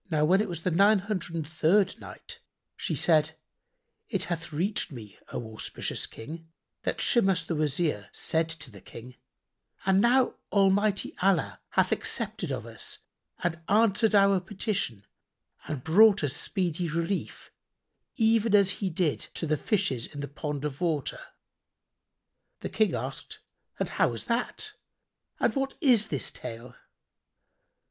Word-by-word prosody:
When 160 Hz, +5 st, +3 dB
it 215 Hz, -, -2 dB
was 170 Hz, -2 st, -5 dB
the 180 Hz, -, +1 dB
Nine 200 Hz, +5 st, +5 dB
Hundred 190 Hz, -3 st, -3 dB
and 160 Hz, -3 st, -3 dB
Third 170 Hz, +5 st, +2 dB
Night, -, -, -10 dB, 0.4 s
She -, -, -2 dB
said, 160 Hz, -1 st, +3 dB, 0.7 s
It -, -, 0 dB
hath 170 Hz, -2 st, -4 dB
reached 180 Hz, +6 st, -1 dB
me, 110 Hz, -6 st, -10 dB
O 110 Hz, -2 st, -5 dB
auspicious 110 Hz, -, -3 dB
King, 160 Hz, +8 st, -9 dB, 0.3 s
that -, -, -1 dB
Shimas 195 Hz, -8 st, +3 dB
the 170 Hz, -, -2 dB
Wazir 150 Hz, -, -1 dB
said 160 Hz, 0 st, 0 dB
to 140 Hz, -5 st, -6 dB
the 100 Hz, -3 st, -13 dB
King, 125 Hz, +2 st, -11 dB, 0.7 s
"And 190 Hz, 0 st, +4 dB
now 245 Hz, +3 st, +3 dB
Almighty 200 Hz, +1 st, +2 dB
Allah 190 Hz, -3 st, +2 dB
hath -, -, +2 dB
accepted -, -, -2 dB
of -, -, -3 dB
us -, -, -7 dB, 0.5 s
and 170 Hz, -1 st, 0 dB
answered 215 Hz, +1 st, +4 dB
our 200 Hz, -1 st, +5 dB
petition 190 Hz, -, -3 dB, 0.6 s
and 145 Hz, -4 st, -4 dB
brought 200 Hz, +4 st, +6 dB
us 145 Hz, -1 st, 0 dB
speedy 175 Hz, -2 st, -1 dB
relief, 170 Hz, +5 st, -3 dB, 0.6 s
even 225 Hz, -3 st, +3 dB
as 200 Hz, -1 st, +5 dB
He 195 Hz, 0 st, -2 dB
did 165 Hz, -3 st, 0 dB, 0.2 s
to -, -, -2 dB
the 155 Hz, -1 st, +1 dB
Fishes 140 Hz, -, 0 dB
in 145 Hz, -, -8 dB
the 145 Hz, -, -4 dB
pond 145 Hz, 0 st, -4 dB
of 145 Hz, +1 st, -4 dB
water." 160 Hz, -5 st, -1 dB, 1.4 s
The -, -, -4 dB
King -, -, +2 dB
asked, -, -, -5 dB, 0.4 s
"And -, -, 0 dB
how -, -, +2 dB
was 115 Hz, -2 st, -4 dB
that, 250 Hz, -, -2 dB, 0.7 s
and -, -, +2 dB
what 270 Hz, 0 st, -1 dB
is 245 Hz, -, +4 dB
the 145 Hz, -, -2 dB
tale?" 115 Hz, +1 st, -5 dB
175 Hz, 145 wpm, -28 LUFS, 150-200 Hz, 1.4 s, brought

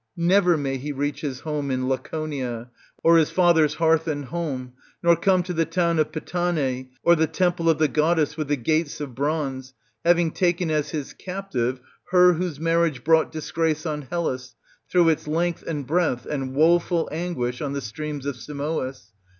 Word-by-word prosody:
Never 175 Hz, 0 st, +4 dB
may 135 Hz, -2 st, -2 dB
he 145 Hz, +3 st, -5 dB
reach 145 Hz, +1 st, -2 dB
his 135 Hz, -5 st, -4 dB
home 150 Hz, -3 st, -3 dB
in 130 Hz, -1 st, -1 dB
Laconia 130 Hz, -4 st, -3 dB, 0.3 s
or 165 Hz, 0 st, +6 dB
his 160 Hz, -2 st, +3 dB
father's 160 Hz, -4 st, +3 dB
hearth 160 Hz, 0 st, +2 dB
and 145 Hz, -3 st, -2 dB
home, 130 Hz, -5 st, -4 dB, 0.3 s
nor 170 Hz, 0 st, +6 dB
come 185 Hz, +2 st, +2 dB
to 180 Hz, 0 st, -4 dB
the 165 Hz, -1 st, +2 dB
town 170 Hz, -1 st, +1 dB
of 155 Hz, -, +1 dB
Pitane' 155 Hz, -7 st, -2 dB
or 170 Hz, -, +6 dB
the 160 Hz, 0 st, +2 dB
temple 170 Hz, +1 st, +1 dB
of 160 Hz, -, +3 dB
the 155 Hz, -, +3 dB
goddess^ 155 Hz, 0 st, +1 dB
with 155 Hz, -2 st, -3 dB
the 145 Hz, -, +2 dB
gates 155 Hz, +4 st, -1 dB
of 145 Hz, -4 st, -5 dB
bronze, 135 Hz, -2 st, -2 dB, 0.3 s
having 170 Hz, -1 st, +3 dB
taken 175 Hz, -1 st, 0 dB
as 150 Hz, -2 st, 0 dB
his 150 Hz, -4 st, -5 dB
captive 130 Hz, -10 st, -3 dB, 0.3 s
her 180 Hz, 0 st, +6 dB
whose 170 Hz, -3 st, -3 dB
marriage 165 Hz, -5 st, +1 dB
brought 160 Hz, +1 st, +3 dB
disgrace 160 Hz, 0 st, -1 dB
on 150 Hz, -2 st, -2 dB
Hellas 130 Hz, -4 st, -3 dB, 0.3 s
through 175 Hz, -2 st, +4 dB
its 155 Hz, -1 st, 0 dB
length 170 Hz, +2 st, 0 dB
and 150 Hz, -4 st, -3 dB
breadth 160 Hz, -5 st, 0 dB
and 135 Hz, -3 st, -4 dB
woful 170 Hz, +2 st, +3 dB
anguish 150 Hz, -8 st, -3 dB
on 140 Hz, -2 st, -2 dB
the 140 Hz, -, -2 dB
streams 145 Hz, +5 st, -5 dB
of 140 Hz, -3 st, -3 dB
Simois 140 Hz, -3 st, -4 dB
155 Hz, 175 wpm, -24 LUFS, 140-170 Hz, 0.3 s, or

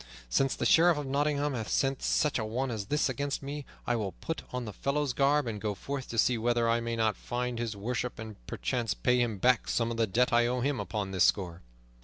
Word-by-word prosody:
Since 135 Hz, -, +2 dB
the -, -, -2 dB
Sheriff 170 Hz, -1 st, +5 dB
of 145 Hz, -, -3 dB
Nottingham 145 Hz, +1 st, 0 dB
hath 110 Hz, -4 st, -4 dB
sent 135 Hz, -1 st, +1 dB
such 150 Hz, -3 st, +1 dB
a -, -, -1 dB
one 120 Hz, +4 st, -2 dB
as 105 Hz, -3 st, -4 dB
this 150 Hz, +4 st, +1 dB
against 140 Hz, +2 st, -2 dB
me, 145 Hz, +1 st, -5 dB, 0.2 s
I 120 Hz, -, +1 dB
will 105 Hz, -5 st, -2 dB
put 165 Hz, -, -5 dB
on 125 Hz, -1 st, -3 dB
the 105 Hz, -, -6 dB
fellow's 140 Hz, +5 st, -1 dB
garb 140 Hz, +2 st, +3 dB
and 105 Hz, -3 st, -4 dB
go 105 Hz, -2 st, -2 dB
forth 135 Hz, +6 st, -5 dB
to 115 Hz, -, -5 dB
see 120 Hz, +1 st, +3 dB
whether 120 Hz, 0 st, +1 dB
I 115 Hz, 0 st, +3 dB
may 115 Hz, 0 st, -2 dB
not 110 Hz, -2 st, +1 dB
find 125 Hz, +2 st, -3 dB
his 115 Hz, -3 st, -2 dB
worship, 120 Hz, +4 st, -3 dB
and 110 Hz, -, -9 dB
perchance 120 Hz, -3 st, -2 dB
pay 125 Hz, 0 st, +2 dB
him 115 Hz, -4 st, 0 dB
back 125 Hz, +3 st, +3 dB
some 115 Hz, -1 st, +1 dB
of 115 Hz, -, -4 dB
the 115 Hz, -1 st, +2 dB
debt 120 Hz, +6 st, +2 dB
I 120 Hz, 0 st, +4 dB
owe 125 Hz, +1 st, -1 dB
him 140 Hz, 0 st, 0 dB
upon 105 Hz, -3 st, -3 dB
this 95 Hz, -2 st, +4 dB
score." 90 Hz, -3 st, 0 dB
120 Hz, 240 wpm, -30 LUFS, 110-135 Hz, 0.2 s, Sheriff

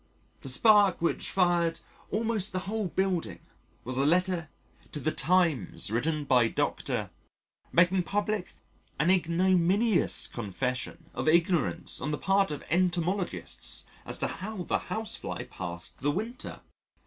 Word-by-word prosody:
The 135 Hz, -, -6 dB
spark 205 Hz, -, +5 dB
which 170 Hz, -, 0 dB
fired 175 Hz, -3 st, +2 dB, 0.3 s
almost 215 Hz, -1 st, -1 dB
the 185 Hz, -, -1 dB
whole 210 Hz, 0 st, -1 dB
building 185 Hz, -1 st, -1 dB, 0.5 s
was 130 Hz, +1 st, -3 dB
a -, -, +3 dB
letter 175 Hz, +1 st, +1 dB, 0.4 s
to 150 Hz, -, -2 dB
the 155 Hz, +3 st, 0 dB
Times 155 Hz, -, +1 dB
written 150 Hz, +6 st, 0 dB
by 125 Hz, -4 st, +4 dB
Dr., -, -, -2 dB, 0.6 s
making 180 Hz, +2 st, +4 dB
public 205 Hz, +1 st, -2 dB, 0.5 s
an 165 Hz, +6 st, +4 dB
ignominious 185 Hz, +4 st, +3 dB
confession 130 Hz, -, -4 dB
of -, -, -3 dB
ignorance 170 Hz, 0 st, +2 dB
on 140 Hz, -, -2 dB
the 150 Hz, -, -1 dB
part 195 Hz, +3 st, +2 dB
of 150 Hz, -, -5 dB
Entomologists 180 Hz, +2 st, -1 dB, 0.2 s
as -, -, -3 dB
to -, -, 0 dB
how 205 Hz, -1 st, -5 dB
the -, -, 0 dB
Housefly 220 Hz, 0 st, -3 dB
passed 85 Hz, -1 st, -6 dB
the 145 Hz, -, 0 dB
winter. 220 Hz, -, -4 dB
175 Hz, 130 wpm, -29 LUFS, 150-195 Hz, 0.6 s, spark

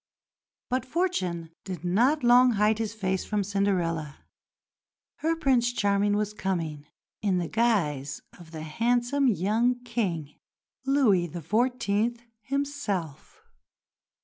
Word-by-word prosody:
But 255 Hz, 0 st, +1 dB
Fortune 195 Hz, -, -2 dB
did 180 Hz, -2 st, -6 dB
not 245 Hz, -, +2 dB
long 245 Hz, +1 st, +6 dB
hide 210 Hz, +1 st, +2 dB
his 220 Hz, -2 st, -2 dB
face 190 Hz, -3 st, -1 dB
from 210 Hz, -1 st, -1 dB
Cinderella. 180 Hz, -6 st, -1 dB, 1.0 s
Her 325 Hz, +1 st, 0 dB
"Prince 255 Hz, -6 st, +2 dB
Charming" 205 Hz, -2 st, +2 dB
was 210 Hz, 0 st, -1 dB
coming 165 Hz, -7 st, -3 dB, 0.3 s
in 195 Hz, -3 st, +1 dB
the 175 Hz, -2 st, -1 dB
guise 155 Hz, -, 0 dB, 0.2 s
of 170 Hz, -2 st, -13 dB
the 160 Hz, -1 st, -7 dB
handsome 240 Hz, -, +1 dB
young 225 Hz, +4 st, +2 dB
King, 180 Hz, -12 st, -3 dB, 0.5 s
Louis 225 Hz, -11 st, +3 dB
XIV. 220 Hz, -, 0 dB, 0.2 s
himself. 275 Hz, -, -4 dB
205 Hz, 110 wpm, -27 LUFS, 175-245 Hz, 1.0 s, long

